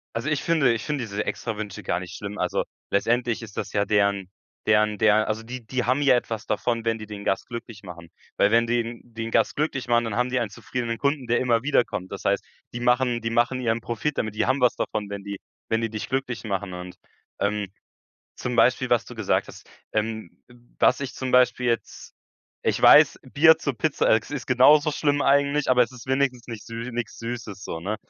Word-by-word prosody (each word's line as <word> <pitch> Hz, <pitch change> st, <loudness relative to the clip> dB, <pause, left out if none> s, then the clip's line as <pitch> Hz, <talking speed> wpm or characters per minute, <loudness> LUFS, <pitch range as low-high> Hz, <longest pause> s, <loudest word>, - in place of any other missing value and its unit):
Also, 115 Hz, +7 st, -2 dB
ich 145 Hz, -, -1 dB
finde 155 Hz, -7 st, +3 dB
ich 115 Hz, -1 st, -2 dB
finde 145 Hz, -4 st, -2 dB
diese 105 Hz, -2 st, -3 dB
Extrawünsche 105 Hz, -4 st, -4 dB
gar 85 Hz, -, -1 dB
nicht 90 Hz, -1 st, -8 dB
schlimm. 105 Hz, 0 st, -6 dB
Also, 90 Hz, -2 st, -1 dB, 0.3 s
letztendlich 120 Hz, +3 st, +1 dB
ist 110 Hz, -3 st, -11 dB
das -, -, -4 dB
ja 100 Hz, -, +2 dB
deren 100 Hz, -2 st, +1 dB, 0.4 s
deren 105 Hz, 0 st, +3 dB
der 110 Hz, 0 st, +4 dB
also, 110 Hz, +1 st, -2 dB
die 120 Hz, +1 st, -8 dB
die 125 Hz, +1 st, -2 dB
haben 130 Hz, +4 st, +2 dB
ja 135 Hz, -3 st, +5 dB
etwas 115 Hz, -3 st, -3 dB
davon, 115 Hz, -1 st, -1 dB
wenn 115 Hz, 0 st, 0 dB
die 110 Hz, -, -8 dB
den 105 Hz, -1 st, -8 dB
Gast 95 Hz, -, 0 dB
glücklich 115 Hz, -3 st, -8 dB
machen, 85 Hz, -3 st, -11 dB, 0.3 s
weil 100 Hz, -, +4 dB
wenn 115 Hz, +1 st, +4 dB
die 120 Hz, 0 st, -1 dB
den 115 Hz, -1 st, -6 dB
Gast -, -, +2 dB
glücklich 140 Hz, -4 st, -2 dB
machen, 120 Hz, 0 st, +3 dB
dann 110 Hz, -2 st, -3 dB
haben 125 Hz, +1 st, +1 dB
die 130 Hz, 0 st, 0 dB
einen 115 Hz, -4 st, -2 dB
zufriedenen 115 Hz, +1 st, -4 dB
Kunden, 140 Hz, -2 st, 0 dB
der 120 Hz, 0 st, +1 dB
immer 120 Hz, -2 st, +1 dB
wiederkommt. 105 Hz, -9 st, 0 dB
Das 100 Hz, -, -7 dB
heißt, 100 Hz, 0 st, +1 dB, 0.3 s
die 120 Hz, -, -4 dB
machen 125 Hz, 0 st, +2 dB
die 115 Hz, 0 st, -2 dB
machen 120 Hz, +2 st, +1 dB
ihren 115 Hz, -2 st, 0 dB
Profit 120 Hz, +6 st, -2 dB
damit. 110 Hz, -1 st, -3 dB
Die -, -, +1 dB
haben 130 Hz, 0 st, +1 dB
was 125 Hz, -, +4 dB
davon, 105 Hz, -2 st, -3 dB
wenn 100 Hz, -1 st, -6 dB
die 100 Hz, -1 st, -6 dB, 0.3 s
wenn 115 Hz, 0 st, +1 dB
die 115 Hz, -, -1 dB
dich 110 Hz, -1 st, -5 dB
glücklich 130 Hz, -3 st, -2 dB
machen 100 Hz, -3 st, -3 dB
und, 90 Hz, 0 st, -8 dB, 0.4 s
ähm, 105 Hz, 0 st, -1 dB, 0.7 s
zum -, -, -4 dB
Beispiel, -, -, +3 dB
was -, -, +3 dB
du -, -, -11 dB
gesagt -, -, 0 dB
hast -, -, -13 dB, 0.2 s
ähm, 110 Hz, -3 st, -2 dB, 0.2 s
w 120 Hz, -, -18 dB, 0.3 s
was 130 Hz, -, +4 dB
ich 135 Hz, -2 st, -4 dB
zum 130 Hz, -1 st, -4 dB
Beispiel 125 Hz, 0 st, +4 dB
jetzt 115 Hz, -1 st, -3 dB, 0.5 s
ich -, -, 0 dB
weiß, -, -, +7 dB
Bier 160 Hz, +2 st, +7 dB
zur 145 Hz, -4 st, -2 dB
Pizza, 155 Hz, -3 st, +1 dB
äh, 110 Hz, -, +5 dB
ist 140 Hz, +5 st, -7 dB
genauso 145 Hz, +4 st, +5 dB
schlimm 145 Hz, -1 st, +1 dB
eigentlich, 140 Hz, +1 st, +2 dB
aber 125 Hz, -1 st, +5 dB
es 120 Hz, +2 st, -8 dB
ist 125 Hz, 0 st, -12 dB
wenigstens 130 Hz, -2 st, 0 dB
nichts 115 Hz, -3 st, -8 dB
sü 115 Hz, +2 st, -6 dB
nix 120 Hz, 0 st, -4 dB
Süßes 115 Hz, -4 st, -6 dB
so, 80 Hz, -, -5 dB
ne? 100 Hz, +6 st, -3 dB
115 Hz, 220 wpm, -24 LUFS, 105-125 Hz, 0.7 s, weiß